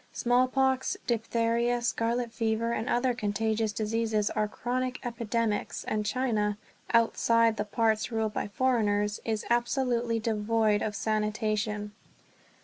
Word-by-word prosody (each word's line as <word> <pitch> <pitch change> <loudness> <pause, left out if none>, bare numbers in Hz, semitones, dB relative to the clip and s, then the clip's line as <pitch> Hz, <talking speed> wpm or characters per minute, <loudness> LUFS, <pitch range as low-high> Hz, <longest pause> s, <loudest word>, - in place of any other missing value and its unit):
Smallpox, 255 +2 +2
diphtheria, 235 +1 +1
scarlet 235 0 -1
fever, 225 0 0
and 230 0 -2
other 245 +1 +2
contagious 220 0 -1
diseases 220 0 0
are 215 -1 0
chronic 250 +3 -2
epidemics; 230 -2 -2
and 215 -1 -2
China, 215 -5 0 0.3
outside 230 0 +3
the 210 - -1
parts 220 +1 0
ruled 220 -2 -1
by - - -2
foreigners, 210 -3 +1
is 220 -2 -2
absolutely 240 -1 +1
devoid 215 -1 +1
of 210 -1 -2
sanitation. 215 0 -1
225 Hz, 115 wpm, -29 LUFS, 215-240 Hz, 0.3 s, outside